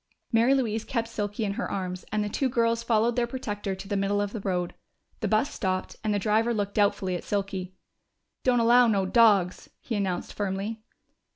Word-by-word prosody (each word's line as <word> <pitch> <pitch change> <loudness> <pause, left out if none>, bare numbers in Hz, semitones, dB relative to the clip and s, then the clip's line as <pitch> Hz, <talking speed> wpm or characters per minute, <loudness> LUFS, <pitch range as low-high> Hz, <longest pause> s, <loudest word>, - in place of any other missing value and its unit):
Mary 235 +4 +4
Louise 225 -4 0
kept 230 -2 -2
Silky 210 -1 -3
in 200 - -1
her - - -3
arms, 185 -1 -4
and 210 0 +1
the - - -2
two 260 +5 0
girls 230 -1 +1
followed 230 0 +2
their 240 -1 +1
protector 205 -6 -4
to 190 - -9
the 205 - -2
middle 200 +1 +1
of 205 0 -2
the 225 - -3
road. 180 -3 -2 0.5
The 215 - -1
bus 220 +8 +1
stopped, 185 -1 -2
and 215 - 0
the 205 - +2
driver 220 +3 +2
looked 200 -1 -2
doubtfully 200 -3 +1
at 175 - -5
Silky. 195 -2 -3 0.7
"Don't 250 -2 +3
allow 240 +1 +6
no 200 -4 +2
dogs," 200 -4 +3
he 235 - -6
announced 190 -3 -2
firmly. 205 +2 -3
210 Hz, 195 wpm, -27 LUFS, 195-230 Hz, 0.7 s, allow